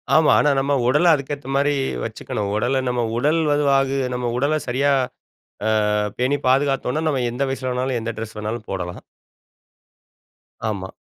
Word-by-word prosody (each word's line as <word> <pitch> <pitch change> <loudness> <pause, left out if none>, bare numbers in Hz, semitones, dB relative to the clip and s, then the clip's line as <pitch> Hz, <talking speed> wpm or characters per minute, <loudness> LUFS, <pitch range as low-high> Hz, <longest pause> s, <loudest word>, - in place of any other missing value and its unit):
ஆமா. 155 -1 +5
ஆனா 150 - +4
நம்ம 140 +1 0
உடல 150 +6 +5
அதுக்கேத்த 140 -1 -6
மாரி 145 +1 +2 0.3
வச்சிக்கணும். 100 -1 -4
உடல 125 +5 +1
நம் 125 -1 0 0.2
உடல் 150 +6 +2
வது 145 0 +2
வாகு 135 0 +2
நம்ம 125 -1 -2
உடல 145 +4 +1
சரியா 135 +3 +2 1.0
அ - - +1 0.2
பேணி 130 +3 +1
பாதுகாத்தோனா, 135 +2 +1
நம்ம 135 -4 0
எந்த 125 +3 -3
வயசுல 130 -1 -3
வேணாலும், 125 0 -1
எந்த 115 +1 -3
டிரெஸ் 110 0 -6
வேணாலும் 110 +1 -4
போடலாம். 90 -2 -4 1.7
ஆமா. 95 -3 -3
130 Hz, 145 wpm, -21 LUFS, 120-145 Hz, 1.7 s, ஆமா